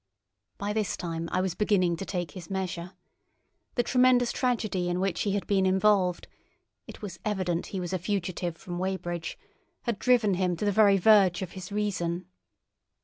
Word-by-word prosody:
By 205 +1 -2
this 210 -5 -1
time 165 -1 -4
I 185 - +1
was 185 -2 -1
beginning 185 -4 +2
to 195 - -5
take 175 -5 -3
his 170 0 -10
measure. 185 -2 -4 0.8
The 240 - +2
tremendous 250 -1 +4
tragedy 215 -8 0
in 175 +1 -1
which 190 -2 0
he 200 - 0
had 200 -4 -1
been 195 -2 +2
involved—it 190 0 -1
was 185 -4 -6
evident 185 -5 -1
he 195 - -4
was 180 0 -4
a 185 - 0
fugitive 175 -3 -2
from 175 0 -6
Weybridge—had 185 +4 -5
driven 240 -5 +3
him 180 -1 +1
to 210 - -2
the 205 - +3
very 200 -1 +5
verge 195 -2 +5
of 180 - -6
his 185 0 -8
reason. 185 -4 -1
190 Hz, 165 wpm, -28 LUFS, 175-210 Hz, 0.8 s, very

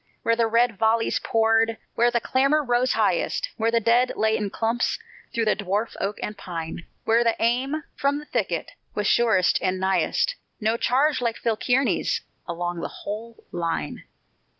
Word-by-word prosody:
Where 230 - +3
the 230 -1 +2
red 230 -2 +2
volleys 225 +1 +2
poured, 225 0 +2 0.2
where 240 +1 +3
the 240 - +1
clamor 275 +6 +2
rose 245 0 +2
highest, - - +1
Where 225 -1 +1
the 230 0 +3
dead 235 +3 +3
lay 220 0 +2
in 205 -2 -1
clumps 230 +4 0 0.3
through 230 -1 0
the 215 - +3
dwarf 205 +3 -2
oak 200 +2 -2
and 210 - -4
pine, 170 -3 -6 0.2
Where 230 +1 +3
the 230 -1 +2
aim 265 +6 0
from 280 +1 +1
the 295 - -8
thicket - - -2 0.2
was 210 - -1
surest 205 -5 +3
and 185 0 0
nighest, 190 - +1 0.2
No 220 0 +1
charge 260 +4 +2
like 235 -2 -1
Phil 230 -2 0
Kearny's 255 +4 +1 0.3
along 175 0 -3
the - - -3
whole 225 +3 -8
line. 170 -1 -3
230 Hz, 170 wpm, -24 LUFS, 210-245 Hz, 0.3 s, Where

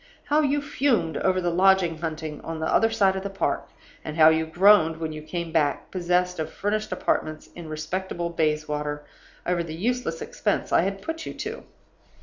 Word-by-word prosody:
How 300 +1 +2
you 285 0 +1
fumed 265 - +1
over 185 -1 +1
the 175 -1 0
lodging 185 -2 +3
hunting 155 -2 -5
on 165 0 -5
the 160 - -2
other 225 +7 +3
side 200 -4 +2
of 190 - -2
the 200 - -4
Park! 195 0 -2 0.3
and 155 +1 -6
how 155 -1 +8
you 160 0 +1
groaned 175 -1 +5
when 160 -1 -4
you 155 - -7
came 165 +2 -5
back, 150 -3 0
possessed 180 -1 0
of 155 - -3
furnished 215 +1 -2
apartments 155 0 -2
in 170 -2 -9
respectable 170 +3 -3
Bayswater, 150 -2 -1 0.4
over 175 -1 +1
the 160 -2 -5
useless 210 -3 -1
expense - - -2
I - - +6
had 195 +2 -3
put 325 0 -5
you - - -6
to! - - -6
170 Hz, 185 wpm, -25 LUFS, 160-195 Hz, 0.4 s, how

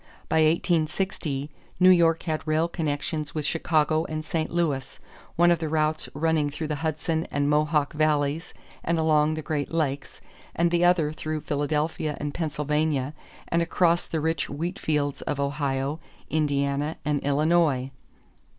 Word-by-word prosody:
By - - +1
1860, 155 -2 0 0.3
New 185 0 +7
York 165 -2 +4
had 155 -1 -3
rail 155 +2 +2
connections 155 -2 -3
with 155 -2 -2
Chicago 155 0 +1
and 155 -1 -4
St. 160 -1 -1
Louis, 155 -6 -1 0.4
one 175 +1 +5
of 170 - +2
the 160 -2 -2
routes 155 0 0
running 155 -1 +1
through 150 +2 -5
the 150 - -1
Hudson 160 +1 -2
and 145 0 0
Mohawk 150 0 +2
valleys 155 +1 0 0.3
and 170 0 0
along 155 -1 +3
the 155 - -5
Great 145 -2 -2
Lakes, 145 -4 -2 0.4
the 170 0 +3
other 175 -4 +3
through 155 0 -4
Philadelphia 150 +1 -1
and 145 0 -3
Pennsylvania 150 -3 -1 0.4
and 170 - +2
across 170 0 +2
the 160 - -2
rich 160 +1 -1
wheat 170 +6 -4
fields 145 -2 -1
of 145 - -3
Ohio, 140 +1 -1 0.3
Indiana, 145 0 0
and 150 -1 0
Illinois. 145 -2 +2
155 Hz, 145 wpm, -26 LUFS, 145-165 Hz, 0.4 s, New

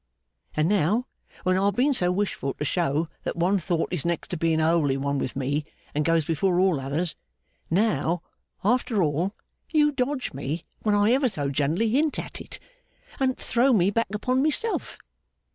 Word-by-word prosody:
And 155 +1 +2
now, 205 +5 +2 0.4
when 185 0 +2
I've 200 0 +2
been 275 +5 +3
so 180 -8 +2
wishful 180 -8 -2
to 150 - -3
show 160 0 0
that - - -3
one 185 +4 +2
thought 170 0 -1
is 175 - -2
next 170 0 -2
to 185 - -3
being 160 0 +1
a 160 - +3
holy 150 -5 +2
one 140 +1 -1
with 130 - -3
me 140 +3 -1 0.3
and 150 - +1
goes 165 -1 +2
before 175 +3 +1
all 185 -6 +3
others 150 +6 -2 0.5
now, 175 -3 +1 0.4
after 225 -2 +2
all, 165 +7 0 0.3
you 300 -2 +4
dodge 260 0 -2
me 140 +5 -4 0.2
when 210 -1 +2
I 205 +2 +4
ever 260 0 +3
so 145 -9 -2
gently 150 +10 +1
hint 290 +6 +2
at - - -6
it, - - -8 0.6
and 260 -1 +1
throw 250 +3 +2
me 195 -2 +3
back 230 +2 +1
upon 255 +5 0
myself. 310 - 0
180 Hz, 180 wpm, -25 LUFS, 155-230 Hz, 0.6 s, you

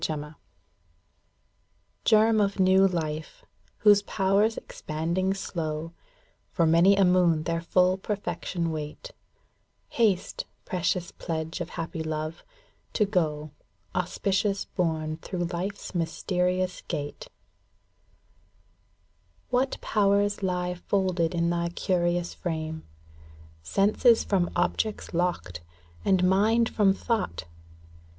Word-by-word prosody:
Gekm 150 -1 -3 2.1
of 200 0 -2
new 190 +1 +5
life, 165 - -4 0.4
whose 205 -1 +7
powers 200 +2 +1
expanding 170 +5 -2
slow 165 -3 -4 0.6
For 170 - +1
many 170 +5 +5
a 195 -1 +4
moon 175 -3 +3
their 165 0 -1
full 180 +2 +2
perfection 190 -4 -3
wait, 155 - -6 0.8
ŌĆö - - -15
Haste, 210 -6 +1 0.2
precious 180 -1 -1
pledge 160 +1 -4
of 175 - -4
happy 165 0 -4
love, 155 0 -4 0.5
to 210 - +3
go 155 -6 -1 0.4
Auspicious 195 +2 0
borne 160 -3 -2
through 175 +2 -4
life's 195 +4 -4
mysterious 180 +2 -1
gate. 145 -3 -5 2.2
What 255 +2 +1
powers 205 0 +2
lie 180 -1 -1
folded 180 -2 0
in 170 0 +1
thy 170 0 0
curious 175 0 0
frame, 160 -2 -4 0.8
ŌĆö - - -17
Senses 215 - +4
from 185 -4 +1
objects 215 -3 -1
locked, 170 - -1 0.4
and 185 -1 +3
mind 220 +5 +3
from 205 -3 +3
thought 205 - -2
180 Hz, 100 wpm, -27 LUFS, 165-195 Hz, 2.2 s, whose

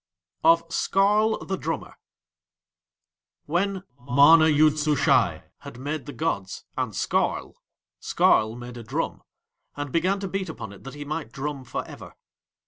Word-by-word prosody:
OF 165 +1 +5
SKARL 210 +3 +2
THE 190 - -2
DRUMMER 165 0 -4 1.5
When 185 +4 -1 0.2
MANA 145 +5 +6
YOOD 155 0 +4
SUSHAI 150 -1 +2 0.2
had - - -10
made 145 +1 -4
the - - -5
gods 145 -12 -3
and - - -2
Skarl, - - -1 0.5
Skarl 110 +1 +2
made 120 0 -9
a 120 - -8
drum, 110 - -3 0.6
and 145 -2 -4
began 185 +5 +1
to 195 - -4
beat 190 -1 -3
upon 110 -10 -7
it 100 - -15
that 135 - -8
he 145 0 -7
might 155 +2 -4
drum 140 0 -5
for 125 - -5
ever. - - -11
155 Hz, 140 wpm, -25 LUFS, 135-175 Hz, 1.5 s, MANA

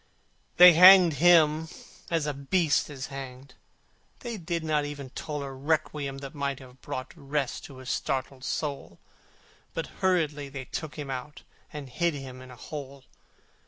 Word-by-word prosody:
They 180 0 +10
hanged 180 -2 +8
him 160 -2 +5 0.4
as 165 -3 0
a 150 - -1
beast 150 +4 +1
is 135 -3 -6
hanged: 130 -1 -9 0.7
They 235 -1 -5
did 170 -2 -3
not 155 -2 +1
even 145 -3 -7
toll 150 0 -5
A 135 - -6
requiem 140 0 -2
that 135 - -9
might 140 -2 -2
have 130 -1 -15
brought 130 - -6
Rest 140 -3 -3
to 135 - -12
his 130 -1 -5
startled 130 0 -3
soul, 145 0 -4 0.8
But - - -2 0.2
hurriedly 155 -6 +1
they 135 -1 -7
took 155 +3 -6
him 145 -3 -6
out, 130 +3 -7 0.3
And 150 -2 -7
hid 165 +6 -1
him 130 -2 -8
in 130 - -12
a 125 - -11
hole. 140 0 -8
145 Hz, 160 wpm, -27 LUFS, 135-160 Hz, 0.8 s, They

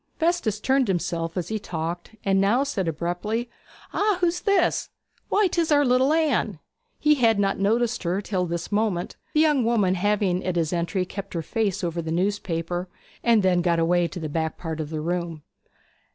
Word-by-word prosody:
Festus 320 - +1
turned 265 +2 +2
himself 170 -2 -2
as 175 -2 -2
he 220 0 -2
talked, 170 +3 -5
and 195 -1 +3
now 225 +7 +3
said 200 -11 -2
abruptly: 175 +9 -2 0.4
'Ah, 415 -2 +2
who's 350 -1 +1
this? 400 -4 +2 0.4
Why, 415 0 +3
'tis 340 -3 0
our 290 -1 +5
little 255 +2 +3
Anne!' 295 - +1 0.4
He 300 0 +4
had 230 -6 +3
not 195 -1 +1
noticed 230 +4 +1
her 180 +2 0
till 190 -3 -1
this 170 +2 -4
moment, 205 -4 0 0.2
the 305 - +5
young 300 -5 +3
woman 220 -5 +2
having 190 -1 +1
at 185 -1 -1
his 165 -1 0
entry 175 +2 -1
kept 200 +1 -7
her 165 - -2
face 200 0 -1
over 170 0 -1
the 160 -1 -4
newspaper, 175 -1 -1 0.3
and 230 -3 +4
then 180 -2 +3
got 170 -1 +2
away 170 +1 +2
to 180 - -7
the 160 - -3
back 160 +1 -2
part 160 -2 -5
of 155 -2 -3
the 155 -1 -3
room. 170 -2 -3
195 Hz, 185 wpm, -25 LUFS, 170-235 Hz, 0.4 s, our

